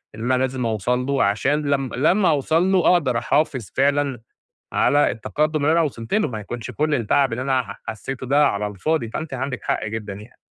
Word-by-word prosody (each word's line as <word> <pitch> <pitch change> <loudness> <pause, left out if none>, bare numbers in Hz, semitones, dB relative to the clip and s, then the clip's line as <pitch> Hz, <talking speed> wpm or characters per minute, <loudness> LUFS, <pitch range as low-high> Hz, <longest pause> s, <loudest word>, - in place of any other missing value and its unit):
اللي 110 +2 -6
أنا 130 +1 +2
لازم 130 -1 -2
أوصل 120 +3 -1
له 140 0 +1
عشان 130 +9 +1
لم 135 -2 0
لمّا 180 - +3
أوصل 160 +5 +2
له 185 -2 +3
أقدر 135 -9 +1
أحافظ 130 -5 0
فعلًا 140 -3 +1 0.5
على 145 +1 +3
التقدم 150 +6 -1
اللي 155 - +4
أنا 165 +1 +4
وصلت 120 -7 -4
له 210 -6 +2
ما 110 -5 -5
يكونش 115 +3 -6
كل 150 0 0
التعب 130 +2 +2
اللي 120 - -3
أنا 130 -1 +1
ح 100 -3 -10
حسيته 130 +4 -5
ده 145 +2 +4
على 105 -4 -1
الفاضي، 115 - -2
فأنتِ 155 +5 -5
عندِك 130 0 -4
حق - - -1
جدًا 110 -2 -5
يعني. 105 +4 -12
130 Hz, 200 wpm, -22 LUFS, 115-150 Hz, 0.5 s, اللي